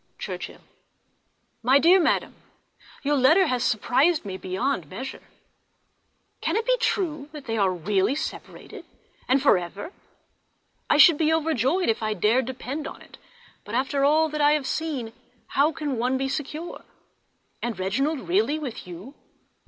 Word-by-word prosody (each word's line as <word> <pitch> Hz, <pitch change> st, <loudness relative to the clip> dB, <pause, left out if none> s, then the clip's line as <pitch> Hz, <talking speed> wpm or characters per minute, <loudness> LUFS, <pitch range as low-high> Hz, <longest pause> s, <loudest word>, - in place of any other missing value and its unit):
_ -, -, -45 dB
Churchhill. -, -, -7 dB, 1.0 s
My 255 Hz, +4 st, +5 dB
dear 345 Hz, +6 st, +6 dB
Mother,—Your 295 Hz, -3 st, -3 dB
letter 305 Hz, +8 st, +5 dB
has 250 Hz, -6 st, 0 dB
surprized 265 Hz, +8 st, +2 dB
me 190 Hz, -2 st, -5 dB
beyond 190 Hz, -, -2 dB
measure! 260 Hz, -, -7 dB, 1.2 s
Can -, -, -1 dB
it 450 Hz, +1 st, 0 dB
be -, -, +3 dB
true 310 Hz, -11 st, -1 dB
that 295 Hz, -3 st, -9 dB
they 225 Hz, -, -2 dB
are 200 Hz, -4 st, +2 dB
really 190 Hz, -, 0 dB
separated—and 270 Hz, -2 st, -5 dB
for 275 Hz, -, +5 dB
ever? 195 Hz, -, -8 dB, 1.0 s
I -, -, +4 dB
should 305 Hz, 0 st, +7 dB
be 315 Hz, -1 st, +3 dB
overjoyed 320 Hz, -, +1 dB
if 225 Hz, -, +1 dB
I 215 Hz, -1 st, -1 dB
dared 225 Hz, +7 st, +2 dB
depend 260 Hz, +4 st, -5 dB
on -, -, -10 dB
it, -, -, -17 dB, 0.4 s
but 210 Hz, -, -6 dB
after 275 Hz, +2 st, 0 dB
all 310 Hz, +3 st, +4 dB
that 300 Hz, 0 st, -3 dB
I 295 Hz, 0 st, +5 dB
have 300 Hz, -3 st, 0 dB
seen 270 Hz, -8 st, -3 dB, 0.4 s
how 290 Hz, +3 st, +2 dB
can 290 Hz, -6 st, -3 dB
one 250 Hz, +2 st, +1 dB
be 270 Hz, 0 st, -1 dB
secure? 300 Hz, +4 st, -5 dB, 0.8 s
And 235 Hz, -4 st, -3 dB
Reginald 265 Hz, +11 st, -1 dB
really 350 Hz, -4 st, +2 dB
with 270 Hz, -11 st, -7 dB
you! 180 Hz, +10 st, -10 dB
275 Hz, 150 wpm, -25 LUFS, 225-310 Hz, 1.2 s, should